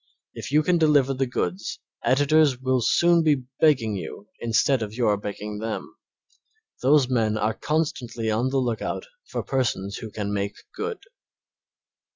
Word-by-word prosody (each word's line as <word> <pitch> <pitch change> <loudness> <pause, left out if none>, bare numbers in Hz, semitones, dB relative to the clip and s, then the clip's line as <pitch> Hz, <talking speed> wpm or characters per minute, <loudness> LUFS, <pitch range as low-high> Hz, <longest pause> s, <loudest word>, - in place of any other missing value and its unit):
If - - -7
you 155 +1 +4
can 175 +1 +2
deliver 145 -4 +4
the 135 0 -1
goods 95 -4 -3 0.2
editors 145 0 +3
will 130 -1 +1
soon 170 +9 +4
be 150 -5 +2 0.2
begging 130 -9 +3
you 100 +2 -7
instead 120 +3 +2
of 110 0 -4
your 115 -4 +2
begging 105 +1 -6
them. 110 0 -5 0.9
Those 135 0 +4
men 110 -4 +1
are 110 +1 0
constantly 125 -8 -2
on 120 +4 +1
the 135 - 0
lookout 120 -4 -2 0.2
for - - -3
persons 100 -7 -1
who 110 - -7
can 105 -1 -4
make 100 0 -2 0.2
good. 445 0 -4
125 Hz, 150 wpm, -25 LUFS, 110-145 Hz, 0.9 s, you